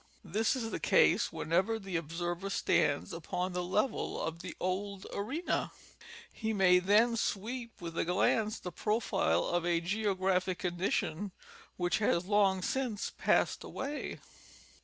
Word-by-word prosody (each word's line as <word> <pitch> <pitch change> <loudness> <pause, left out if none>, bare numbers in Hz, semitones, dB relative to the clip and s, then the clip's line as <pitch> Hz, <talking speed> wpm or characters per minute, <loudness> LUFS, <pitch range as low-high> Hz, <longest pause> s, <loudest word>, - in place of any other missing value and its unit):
This 215 - +1
is 225 -3 -3
the - - -3
case - - +4
whenever 185 +7 +1
the 195 -4 -6
observer 175 +4 -3
stands 145 -7 +1
upon 180 +2 -3
the 180 - -1
level 210 +7 0
of 165 +1 -3
the 180 - -7
old 190 +1 -2
arena; 270 - -2 0.6
he 220 -1 -2
may 185 -3 +5
then 215 +6 +4
sweep 230 +2 -3
with 170 -1 -6
a - - +3
glance 210 +5 +2
the 180 - -6
profile 210 - +1
of 175 -1 0
a 170 -1 +2
geographic 185 -1 0
condition 180 +1 -1 0.4
which 175 +2 +1
has 185 -4 +2
long 195 -2 +3
since 245 -4 -1
passed - - +2
away. 285 +2 -4
190 Hz, 140 wpm, -32 LUFS, 175-215 Hz, 0.6 s, may